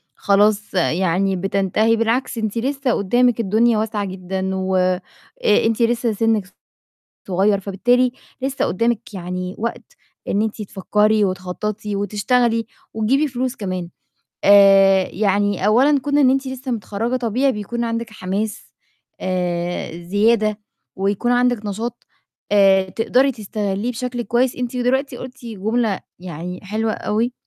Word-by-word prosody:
خلاص 205 Hz, +1 st, +2 dB
يعني 185 Hz, +2 st, +1 dB
بتنتهي، 195 Hz, +4 st, +1 dB
بالعكس 230 Hz, +2 st, 0 dB
أنتِ 220 Hz, 0 st, -2 dB
لسّه 270 Hz, +1 st, -1 dB
قُدّامِك 240 Hz, +4 st, +2 dB
الدنيا 225 Hz, +2 st, +2 dB
واسعة 215 Hz, -1 st, -1 dB
جدًا 190 Hz, 0 st, -4 dB
و 190 Hz, 0 st, -1 dB
أ 185 Hz, 0 st, +2 dB, 0.6 s
أنتِ 225 Hz, +1 st, +1 dB
لسّه 235 Hz, 0 st, +2 dB
سِنِّك 210 Hz, -3 st, 0 dB, 0.7 s
صغير، 195 Hz, +2 st, +2 dB
فبالتالي 245 Hz, +6 st, +1 dB, 0.3 s
لسّه 270 Hz, +1 st, -1 dB
قُدّامِك 230 Hz, +2 st, -1 dB
يعني 180 Hz, 0 st, -5 dB
وقت 235 Hz, +1 st, -5 dB, 0.3 s
إن 205 Hz, -, +1 dB
أنتِ 220 Hz, 0 st, -3 dB
تفكّري 210 Hz, +2 st, +1 dB
وتخطّطي 200 Hz, +3 st, -4 dB
وتشتغلي 225 Hz, +3 st, +1 dB, 0.3 s
وتجيبي 260 Hz, +8 st, +1 dB
فلوس 255 Hz, 0 st, -3 dB
كمان. 185 Hz, -4 st, -4 dB, 0.6 s
آآ، 195 Hz, -1 st, +6 dB
يعني 200 Hz, 0 st, +1 dB
أولًا 270 Hz, +7 st, +4 dB
كُون 285 Hz, +2 st, 0 dB
إن 265 Hz, -3 st, +5 dB
أنتِ 270 Hz, +1 st, 0 dB
لسّه 260 Hz, 0 st, -6 dB
متخرّجة 230 Hz, +2 st, -2 dB
طبيعي 255 Hz, +3 st, +1 dB
بكون 235 Hz, +3 st, -4 dB
عندِك 230 Hz, 0 st, -3 dB
حماس 205 Hz, +1 st, -4 dB, 0.5 s
آآ، 175 Hz, -2 st, -2 dB
زيادة، 210 Hz, +3 st, +2 dB, 0.4 s
ويكون 200 Hz, +5 st, 0 dB
عندِك 245 Hz, -3 st, +1 dB
نشاط 225 Hz, +4 st, -5 dB, 0.5 s
آآ 195 Hz, -1 st, +5 dB
تقدري 255 Hz, +6 st, +2 dB
تستغليه 210 Hz, 0 st, -3 dB
بشكل 245 Hz, +1 st, -4 dB
كويس. 240 Hz, +3 st, +1 dB
أنتِ 250 Hz, 0 st, -4 dB
دلوقتي 260 Hz, +2 st, 0 dB
قُلتِ 255 Hz, +1 st, -10 dB
جملة 220 Hz, 0 st, -1 dB, 0.2 s
يعني 180 Hz, 0 st, -7 dB
حلوة 220 Hz, +3 st, -2 dB
أوي، 230 Hz, +4 st, -1 dB
215 Hz, 125 wpm, -20 LUFS, 195-240 Hz, 0.7 s, آآ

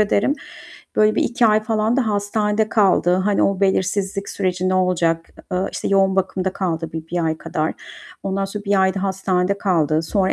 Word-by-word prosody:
ederim. 210 Hz, +5 st, +2 dB, 0.6 s
Böyle 215 Hz, 0 st, +4 dB
bir -, -, +2 dB
2 235 Hz, -1 st, +2 dB
ay 215 Hz, 0 st, +3 dB
falan 220 Hz, +2 st, 0 dB
da 255 Hz, -4 st, +1 dB
hastanede 210 Hz, +1 st, 0 dB
kaldı. 190 Hz, -5 st, +3 dB
Hani, 195 Hz, +2 st, +1 dB
o 195 Hz, 0 st, +1 dB
belirsizlik 195 Hz, +1 st, 0 dB
süreci 185 Hz, -1 st, -1 dB
ne 185 Hz, -, +1 dB
olacak? 170 Hz, -3 st, +1 dB, 0.2 s
E -, -, 0 dB
eee, 185 Hz, -, 0 dB
işte, -, -, -3 dB
yoğun 195 Hz, -1 st, +3 dB
bakımda 190 Hz, 0 st, -1 dB
kaldı 165 Hz, -5 st, -3 dB
bir 160 Hz, 0 st, -6 dB
bir 175 Hz, 0 st, -1 dB
ay 160 Hz, 0 st, -1 dB
kadar. 155 Hz, 0 st, -2 dB, 0.5 s
Ondan 195 Hz, 0 st, -1 dB
sonra 205 Hz, +1 st, -6 dB
1 200 Hz, -1 st, +2 dB
ayda 190 Hz, 0 st, +1 dB
hastanede 190 Hz, 0 st, 0 dB
kaldı. 160 Hz, -6 st, +1 dB
Sonra 190 Hz, +3 st, 0 dB
195 Hz, 185 wpm, -20 LUFS, 180-205 Hz, 0.6 s, Böyle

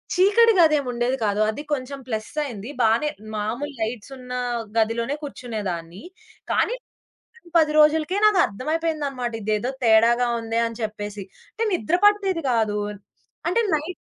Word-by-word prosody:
చీకటి 435 Hz, +5 st, +5 dB
గదేముండేది 265 Hz, -5 st, +2 dB
కాదు. 205 Hz, 0 st, 0 dB
అది 290 Hz, +7 st, -4 dB
కొంచెం 275 Hz, 0 st, -4 dB
ప్లస్ 220 Hz, -2 st, -3 dB
అయింది. 230 Hz, -4 st, -6 dB
బానే 235 Hz, +7 st, +3 dB, 0.3 s
మాములు 240 Hz, +8 st, -3 dB
లైట్స్ 225 Hz, +2 st, -4 dB
ఉన్న 250 Hz, 0 st, -11 dB, 0.5 s
గదిలోనే 230 Hz, +5 st, +1 dB
కూర్చునేదాన్ని. 200 Hz, -, -5 dB, 0.5 s
కానీ -, -, +1 dB, 0.6 s
వారం, 470 Hz, -7 st, -20 dB
10 310 Hz, -2 st, +4 dB
రోజులకే, 310 Hz, +5 st, +4 dB
నాకు 420 Hz, -3 st, +5 dB
అర్థమైపోయిందన్నమాట. 280 Hz, +1 st, -2 dB
ఇదేదో 215 Hz, +3 st, -1 dB
తేడాగా 235 Hz, +2 st, +5 dB
ఉందే 225 Hz, 0 st, -2 dB
అని 230 Hz, +1 st, -9 dB
చెప్పేసి. 210 Hz, -2 st, -5 dB, 0.3 s
అంటే 455 Hz, -, -2 dB
నిద్ర 340 Hz, +1 st, +1 dB
పట్టేది 390 Hz, -5 st, +3 dB
కాదు, 220 Hz, -3 st, +1 dB, 0.7 s
అంటే 365 Hz, +7 st, +2 dB
నైట్ 310 Hz, +5 st, -4 dB
250 Hz, 130 wpm, -23 LUFS, 220-310 Hz, 0.7 s, చీకటి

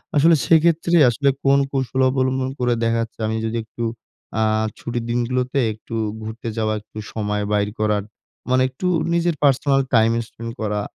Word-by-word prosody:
আসলে 160 Hz, +3 st, +6 dB
সেক্ষেত্রে 165 Hz, +1 st, +3 dB
আসলে 140 Hz, +4 st, +1 dB
কোন 140 Hz, 0 st, +4 dB
কৌশল 130 Hz, -1 st, -1 dB
অবলম্বন 130 Hz, 0 st, 0 dB
করে 125 Hz, -1 st, +2 dB
দেখা 115 Hz, 0 st, +2 dB
যাচ্ছে 115 Hz, 0 st, -7 dB
আমি 110 Hz, -, -1 dB
যদি 115 Hz, +1 st, -2 dB
একটু 115 Hz, +1 st, -7 dB, 0.6 s
আ -, -, +4 dB, 0.4 s
ছুটির 120 Hz, -1 st, -4 dB
দিনগুলোতে 125 Hz, +3 st, 0 dB
একটু 110 Hz, +2 st, -9 dB, 0.3 s
ঘুরতে 110 Hz, +2 st, -7 dB
যাওয়া, 110 Hz, -1 st, 0 dB
একটু 110 Hz, -, -16 dB, 0.2 s
সময় 105 Hz, -1 st, -1 dB
বাইর 105 Hz, 0 st, +1 dB
করার 105 Hz, -1 st, +1 dB, 0.5 s
মানে 130 Hz, 0 st, +4 dB
একটু 135 Hz, +8 st, -4 dB, 0.3 s
নিজের 170 Hz, -1 st, +1 dB
পার্সোনাল 135 Hz, 0 st, +3 dB
টাইম 110 Hz, 0 st, +5 dB, 0.2 s
স্পেন্ড 115 Hz, 0 st, -8 dB
করা, 105 Hz, -1 st, -1 dB
120 Hz, 160 wpm, -21 LUFS, 110-135 Hz, 0.6 s, আসলে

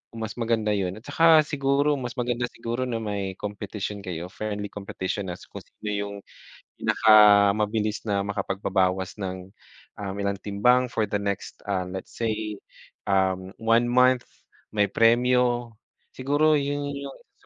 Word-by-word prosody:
Mas 110 Hz, -2 st, -4 dB
maganda 115 Hz, -2 st, +1 dB
yun 95 Hz, -2 st, -1 dB
at 110 Hz, -, -13 dB
saka 165 Hz, -1 st, +5 dB
siguro 140 Hz, 0 st, +1 dB
mas 125 Hz, -1 st, -5 dB
maganda 120 Hz, 0 st, -1 dB
siguro 120 Hz, +2 st, -4 dB
na 115 Hz, -, -1 dB
may 100 Hz, -2 st, -3 dB
competition 105 Hz, 0 st, -5 dB
kayo, 85 Hz, -1 st, -5 dB
friendly 105 Hz, 0 st, -4 dB
competition 100 Hz, 0 st, -4 dB
na 90 Hz, -, -4 dB, 0.2 s
kung -, -, -8 dB
sino 105 Hz, -, -8 dB
yung 100 Hz, 0 st, -3 dB, 0.6 s
pinakamabilis 105 Hz, 0 st, +4 dB
na 100 Hz, -1 st, +1 dB
makapagbabawas 95 Hz, -1 st, -1 dB
ng, 95 Hz, -1 st, -5 dB, 0.5 s
um, 95 Hz, -1 st, -4 dB
ilang 100 Hz, 0 st, -1 dB
timbang 125 Hz, +5 st, +3 dB
for 110 Hz, -2 st, 0 dB
the 105 Hz, -, 0 dB
next, 100 Hz, -1 st, -4 dB
ah, 95 Hz, -2 st, 0 dB
let's 95 Hz, 0 st, -7 dB
say, 110 Hz, -2 st, -2 dB, 0.6 s
um, 95 Hz, -1 st, +1 dB
1 115 Hz, +1 st, +3 dB
month, 125 Hz, 0 st, +4 dB, 0.5 s
may 105 Hz, -1 st, +3 dB
premyo. 120 Hz, +1 st, +2 dB, 0.4 s
Siguro 145 Hz, +4 st, +2 dB
yun 145 Hz, 0 st, -2 dB
yung 140 Hz, 0 st, -6 dB
isa -, -, -33 dB
105 Hz, 140 wpm, -25 LUFS, 100-120 Hz, 0.6 s, saka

